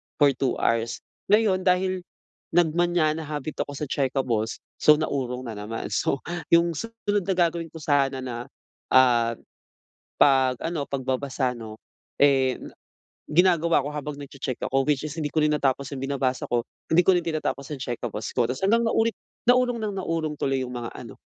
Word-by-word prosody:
for 145 -2 +5
2 130 -1 -1
hours. 115 +1 0 0.2
Ngayon 200 -3 +3
dahil, 185 0 +2 0.5
nagmaña 175 -1 +3
habit 150 0 -5
ako 145 - -8
sa 150 - -4
checkables, 130 -5 -1 0.2
so, 150 - +7
naurong 130 -5 -2
na 115 - -5
naman. 110 +2 -5
So 135 - 0 0.3
yung 170 -1 +4
susunod 210 -3 -2
na 195 - +1
gagawin 170 -1 +1
ko 160 - -9
sana 140 -3 +1
na, 120 -1 -5 0.5
ah, 120 -3 +5 0.9
'pag 130 -2 +4
ano 165 -4 -2
pagbabasa 130 -1 -1
'no, 110 -2 -9 0.4
eh 135 -2 +4 0.7
ginagawa 170 0 +4
ko - - -3
habang 150 0 -4
nagche-check 135 -3 -5
ako, 135 +1 +2
which 145 0 +1
is 150 - -6
hindi 150 - -1
ko 155 - -1
rin 150 - +2
natapos 140 -1 0
yung 130 - -6
binabasa 135 -2 -1
ko, 120 -1 +1 0.3
hindi 170 +2 +5
ko 190 - +7
rin 175 - +2
tinatapos 155 -4 -2
ang 145 - -4
checkables 120 -3 -4
ko. 120 -2 +2
Tas 130 - -3
hanggang 230 +4 +4
naulit 225 0 +2 0.3
naurong 245 -1 +4
ng 215 -2 -2
naurong 160 -3 -2
tuloy 135 -1 0
yung 125 - -8
mga 120 -1 -4
ano, - - -9
145 Hz, 165 wpm, -25 LUFS, 130-170 Hz, 0.9 s, so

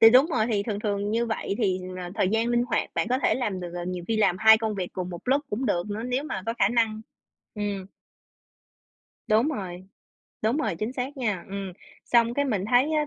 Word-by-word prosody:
Thì 225 0 +10
đúng 260 +5 +7
rồi, 245 -9 +1
thì 205 -3 +1
thường 205 -1 -3
thường 205 -1 -1
như 235 +2 +1
vậy 220 -3 -2
thì 190 -5 +1 0.2
là 180 -1 -6
thời 185 - +2
gian 225 +3 +1
linh 240 0 +2
hoạt, 245 - -1
bạn 220 - 0
có 255 - +2
thể - - +3
làm 210 -8 -2
được 175 -1 -6
à, 175 0 -4
nhiều 180 -1 -4
khi 225 - +1
làm 195 -4 +3
2 220 0 +8
công 220 -2 -1
việc 185 -2 -4
cùng 180 -1 -4
một 175 - -7
lúc 280 +2 +3
cũng 240 +5 -1
được 175 -2 0
nữa, 215 +2 -3
nếu 250 +4 -1
mà 190 -10 -4
có 230 - -1
khả 195 - +4
năng, 225 -2 +1 0.5
ừm. 205 -2 -3 1.4
Đúng 220 +7 +4
rồi. 185 - -5 0.6
Đúng 225 +6 +2
rồi, 245 - -1
chính 220 +4 -2
xác 265 +2 -4
nha, 210 -9 -1
ừm, 195 -1 -5 0.3
xong 235 0 +3
cái 285 - +1
mình 210 -8 0
thấy 260 +6 +4
á 300 -1 +2
220 Hz, 235 wpm, -26 LUFS, 195-245 Hz, 1.4 s, Thì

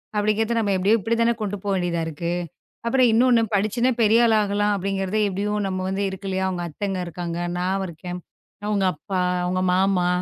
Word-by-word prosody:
அப்படிங்கிறதை 215 +2 +1
நம்ம 205 -3 +1
எப்படி 190 +3 +2
இப்படிதானே 230 +3 +1
கொண்டு 205 -1 -2
போக 200 -1 0
வேண்டி 175 -1 0 0.2
இருக்கு. 170 +2 -3 0.5
அப்புறம் 255 +1 +4
இன்னொன்னு 240 +1 +4
படிச்சு 215 +5 +2
பெரிய 225 +2 +5
ஆளா 225 -2 +4
ஆகலாம். 205 +1 +1
அப்படிங்கறத 195 +1 -2
எப்டியோ 200 +2 -2
நம்ம 185 -1 -2
வந்து 195 +1 -1
இருக்கு. 190 +1 -6 0.2
அவங்க 180 -2 -3
அத்தங்க 195 +5 -3
இருக்காங்க. 170 0 -5 0.2
நான் 190 +2 -1
இருக்கேன். 175 +2 -7 0.5
உங்க 200 -2 +1
அப்பா, 185 +4 -3 0.3
உங்க 185 0 0
மாமா 185 -1 +2
195 Hz, 165 wpm, -23 LUFS, 185-215 Hz, 0.5 s, பெரிய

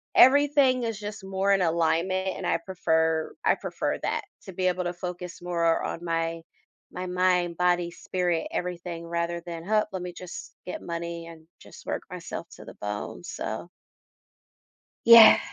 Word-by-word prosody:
everything 275 -1 +6
is 225 -3 -3
just 210 0 -7
more 195 +1 0
in 195 - +2
alignment 170 +3 +1
and 185 - -5
I 165 - +2
prefer 160 -2 0
I - - +5
prefer - - -3
that, - - 0 0.2
to 190 - -8
be 185 +1 0
able 180 0 0
to 175 - -1
focus 180 0 -6
more 170 -2 +1
on 170 - -4
my 165 -1 -1 0.5
my 185 0 -5
mind, 180 -1 +1
body, 175 -1 +2
spirit, 175 -1 -1
everything 175 -1 -4
rather 170 0 -2
than, 165 -1 -6
"Huh, 215 +2 +3
let 190 -1 -4
me 180 -1 -6
just 180 0 -9
get 180 - -5
money 170 0 -5
and 160 -1 -13
just - - -14
work - - -2
myself - - -6
to - - -12
the - - -11
bone." 105 0 -5
So 110 +9 -5 1.4
Yeah. 230 -1 +10
175 Hz, 160 wpm, -27 LUFS, 170-190 Hz, 1.4 s, Yeah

